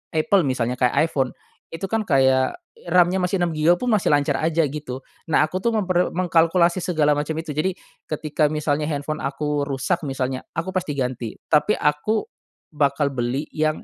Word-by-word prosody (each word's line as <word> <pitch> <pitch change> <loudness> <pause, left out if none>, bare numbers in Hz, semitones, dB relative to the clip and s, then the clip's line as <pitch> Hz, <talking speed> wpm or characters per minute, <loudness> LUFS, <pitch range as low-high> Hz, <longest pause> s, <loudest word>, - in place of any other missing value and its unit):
Apple 185 +5 +3
misalnya 125 -1 -1
kayak 155 +6 +2
iPhone, 130 -3 0 0.4
itu 165 +3 -8
kan 225 0 +1
kayak 130 -3 +3 0.3
RAM-nya 180 +1 +4
masih 180 +2 0
6 170 - 0
giga 155 +3 +4
pun 245 +6 -2
masih 210 -3 +2
lancar 145 -1 +2
aja 165 +1 +2
gitu. 135 -3 -6 0.3
Nah, - - +4
aku 185 +4 -4
tuh 235 - +2
memper 185 -3 +1
mengkalkulasi 170 0 +3
segala 155 -4 +2
macam 150 +2 -2
itu 160 -1 -4
jadi 175 +5 -1 0.3
ketika 155 0 0
misalnya 150 0 -1
handphone 150 +1 -3
aku 145 +1 -2
rusak 140 +6 -1
misalnya 130 -1 -2
aku 170 +4 -2
pasti 180 -5 -1
ganti 125 -3 -3 0.2
tapi 155 +8 +4
aku, 150 - +1 0.5
bakal 140 0 +1
beli 125 +4 -2
yang 155 0 0
155 Hz, 170 wpm, -22 LUFS, 140-175 Hz, 0.5 s, RAM-nya